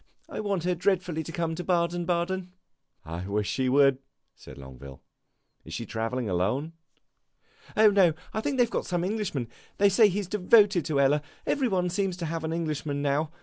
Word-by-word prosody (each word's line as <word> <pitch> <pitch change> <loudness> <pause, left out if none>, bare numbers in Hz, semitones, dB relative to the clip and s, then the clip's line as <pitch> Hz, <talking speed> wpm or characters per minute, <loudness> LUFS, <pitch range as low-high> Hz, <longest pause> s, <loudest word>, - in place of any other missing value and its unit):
I - - -6
want 200 -5 -1
her 180 +1 +1
dreadfully 180 -2 0
to 160 - -7
come 165 -1 -2
to 175 +2 -5
Baden 175 -1 0
Baden." 180 +1 -1 0.5
"I 85 +2 -5
wish 105 0 -1
she 130 -1 0
would," 135 0 +4 0.4
said - - -13
Longueville. 65 0 -11 0.6
"Is 80 - -8
she 115 - -4
travelling 115 +2 -3
alone?" 105 - -1 1.0
"Oh, 215 -1 +7
no. 190 -5 +4 0.3
They 260 -1 +2
've - - -11
got - - -2
some 175 -2 -1
Englishman. 190 - -2 0.3
They 200 0 +5
say 210 +2 +5
he 200 +2 -2
's - - -6
devoted 200 -2 +4
to 150 -3 0
Ella. 140 +2 +3 0.2
Every 270 -3 +1
one 180 -4 0
seems 185 -1 -1
to 175 - -4
have 165 0 -3
an 160 - -2
Englishman, 155 -3 -2
now. 145 +2 0
170 Hz, 185 wpm, -27 LUFS, 140-190 Hz, 1.0 s, Oh